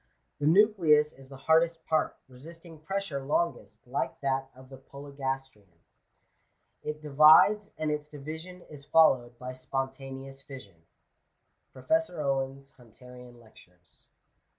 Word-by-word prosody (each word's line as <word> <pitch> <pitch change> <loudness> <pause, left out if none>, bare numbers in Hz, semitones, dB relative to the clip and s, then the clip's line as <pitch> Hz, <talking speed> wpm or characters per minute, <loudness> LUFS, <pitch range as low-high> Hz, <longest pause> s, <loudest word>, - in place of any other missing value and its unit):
The 145 - 0
nucleus 165 -5 +4
is 135 0 -17
the 135 - -11
hardest 165 +3 +2
part, 160 -1 0
resisting 165 +5 -14
pressure 165 -4 -4
longest, 135 -8 -2
like 125 +3 -3
that 135 -1 -1
of 130 0 -16
the 135 - -11
Polygastrian. 135 -8 -7 1.0
It 150 0 -6
divides, 155 +8 +6
and 155 -1 -1
its 150 0 -3
division 160 +5 -9
is 145 -2 -12
followed 130 -6 +3
by 125 +1 -7
spontaneous 135 +1 -6
fission.'' 100 - -13 0.4
— - - -49
Prtfeuor 180 +8 0
Owen's 135 -1 -3
HunUrian 125 +1 -15
Lecture*. 90 -6 -19
140 Hz, 120 wpm, -28 LUFS, 130-155 Hz, 1.0 s, divides